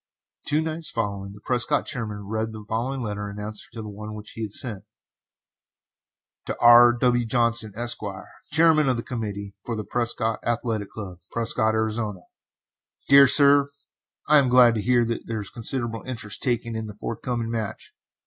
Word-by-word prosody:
Two 150 +1 +2
nights 160 0 -3
following, 100 -4 -3
the 105 - -14
Prescott 125 +5 +1
chairman 105 -6 -5
read 110 +2 -3
the 110 -1 -9
following 125 +4 -2
letter 105 -1 -4
in 100 +1 -8
answer 105 0 -7
to 115 - -7
the - - -8
one 105 +1 -8
which 105 0 -9
he 115 - -8
had 110 -2 -4
sent: 105 -3 -4 1.6
TO - - -3
R. 120 0 +8
W. 120 0 +1
JOHNSON, 115 -2 +1
ESQ., 120 +1 +1 0.5
Chairman 155 -2 +4
of 125 - +1
the 115 - -4
Committee 100 -5 -5
for 120 - -4
the 110 - -4
Prescott 115 -1 -1
Athletic 115 -3 -2
Club, 95 -5 -8
Prescott, 110 -1 0
Arizona: 110 -3 -2 0.9
DEAR 140 0 +8
SIR: 140 +1 +6 0.6
I 150 0 +7
am 135 -3 +2
glad 125 -1 +6
to 110 - -2
hear 120 +2 +2
that 115 0 -4
there 115 -1 -3
is 100 - -5
considerable 120 -1 -2
interest 115 -4 -5
taken 120 -3 -1
in 110 0 -4
the 105 - -9
forthcoming 115 0 -3
match. 110 -3 -5
115 Hz, 170 wpm, -24 LUFS, 105-125 Hz, 1.6 s, R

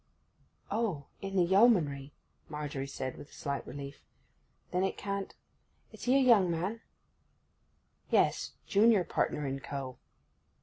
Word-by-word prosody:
'Oh—in 195 -2 -3
the 185 - +5
Yeomanry,' 170 - +3 0.4
Margery 145 -3 -4
said, 130 -2 -5
with 145 - -11
a - - -19
slight 140 -1 -4
relief. 140 +1 -8 0.7
'Then 180 +1 +1
it 190 - -1
can't—is 200 -1 -8
he 255 +2 +4
a - - +6
young 230 -9 +5
man?' 185 +7 -2 1.3
'Yes, - - +2
junior 210 -1 +4
partner 150 -3 -1
in 135 0 -2
co. 135 -2 -6
170 Hz, 120 wpm, -31 LUFS, 140-200 Hz, 1.3 s, a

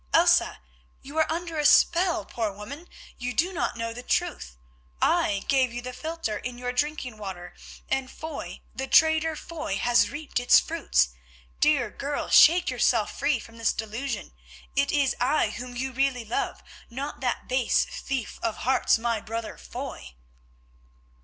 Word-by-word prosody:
Elsa, - - +4 0.4
you 280 +3 -10
are 315 - +2
under 335 -1 -3
a - - +1
spell, 340 - +4
poor 220 -1 -2
woman; 265 - -9 0.3
you 250 0 -3
do 360 +4 +1
not 345 -8 -2
know 230 0 -3
the 245 - -7
truth. 65 - -2 0.4
I 200 -1 +2
gave 260 -3 +3
you 240 - -5
the 255 0 -6
philtre 315 -8 -3
in 250 -1 -6
your 245 0 -3
drinking 255 -4 -2
water, 180 -3 -7 0.3
and 265 -1 -1
Foy, 320 +3 -7
the 265 +1 -4
traitor 315 +2 +4
Foy, 310 -15 -4
has 240 +2 +3
reaped 295 -3 -3
its 245 - +6
fruits. 330 +1 +1 0.5
Dear 280 -7 +3
girl, 285 +1 -4
shake 345 -1 +7
yourself 235 -3 +1
free 285 -1 +2
from 230 +1 -12
this 225 - +2
delusion, 225 +5 -4 0.4
it 280 0 +2
is 280 -3 +2
I 250 -3 +2
whom 245 +2 -7
you 260 +2 -2
really 260 -2 0
love, 220 - -3 0.3
not 275 +5 -5
that 250 -2 -2
base 255 -2 +2
thief 265 -5 -5
of 225 - -2
hearts, 255 -2 +3
my 230 -1 -1
brother 225 +1 -5
Foy." 65 -1 -8
255 Hz, 160 wpm, -26 LUFS, 230-295 Hz, 0.5 s, shake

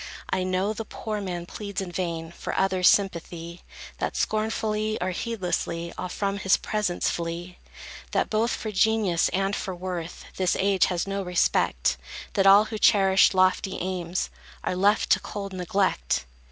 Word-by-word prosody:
I 185 - +1
know 185 +3 0
the 225 - -5
poor 215 -1 -5
man 175 -3 -4
pleads 200 +2 -5
in 190 -2 -4
vain, 170 -2 -3
For - - -5
others' 185 -1 +3
sympathy; 170 -3 -1 0.4
That - - -2
scornfully, 215 0 0
or 185 +1 -1
heedlessly, 175 -5 -3
All 185 - -4
from 200 +1 -2
his 190 0 +4
presence 210 -5 -1
flee; 170 +1 -5 0.5
That - - +1
both 220 +2 +1
for 220 - -3
genius 210 -4 +2
and 195 +2 0
for 190 - -4
worth, 175 -2 -5
This 185 -2 +2
age 195 -1 +3
has 180 -2 -1
no 195 0 -2
respect; 180 -1 +1 0.4
That 195 -2 +3
all 200 +2 +8
who 215 0 -5
cherish 195 -3 +5
lofty 185 +1 +2
aims 180 -1 -2 0.3
Are - - -1
left 200 +3 +2
to - - +6
cold 200 -2 -6
neglect. 180 - 0
190 Hz, 155 wpm, -26 LUFS, 175-205 Hz, 0.5 s, all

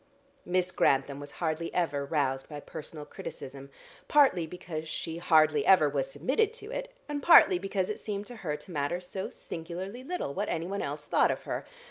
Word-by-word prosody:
Miss 180 0 +1
Grantham 135 -2 +2
was 145 - -8
hardly 165 0 -1
ever 145 -5 +1
roused 140 -2 -1
by 150 -1 -6
personal 150 +1 -8
criticism, 140 -1 -8 0.4
partly 265 - +4
because 160 -2 -6
she 165 +1 -4
hardly 155 -4 +4
ever 185 -6 +6
was 140 -2 -1
submitted 410 - +1
to 440 -1 -9
it, - - -4 0.2
and 295 -1 -3
partly 230 - +8
because 195 -1 -1
it 210 - -4
seemed 205 -1 -4
to 245 +1 -10
her 155 -8 -3
to 150 +5 -13
matter 150 +3 -1
so 185 +1 -5
singularly 180 +8 -7
little 310 - -3
what 205 +5 -2
anyone 185 +5 -2
else - - -4
thought - - +3
of - - -2
her. - - -4
170 Hz, 180 wpm, -30 LUFS, 150-200 Hz, 0.4 s, partly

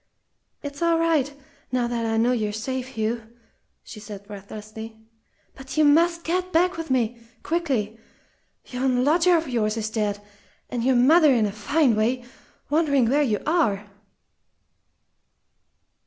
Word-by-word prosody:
"It's 285 +1 -7
all 335 -1 +3
right 320 -4 +1 0.4
now 250 -1 +1
that 235 -1 -2
I 225 0 0
know 235 +2 +3
you're 215 -4 0
safe, 255 +4 -4
Hugh," 225 +2 -1 0.6
she 215 - -10
said 205 -1 -9
breathlessly. 215 +2 -9 0.5
"But 265 +2 -9
you 310 - +5
must 335 +3 +3
get 365 +2 -1
back 360 +2 +2
with 330 0 -6
me 240 -2 0 0.2
quickly. 260 -11 -1 0.7
Yon 250 0 0
lodger 340 +4 +4
of 320 -1 -3
yours 225 -3 -1
is 220 0 -3
dead, 210 -2 -1 0.5
and 240 -2 -2
your 260 +1 +3
mother 300 +5 +6
in 235 -4 +3
a 205 - -1
fine 255 +5 +1
way, 240 +3 0 0.5
wondering 280 -6 +2
where 290 +2 +3
you 225 -8 0
are!" 210 - 0
250 Hz, 140 wpm, -24 LUFS, 220-310 Hz, 0.7 s, mother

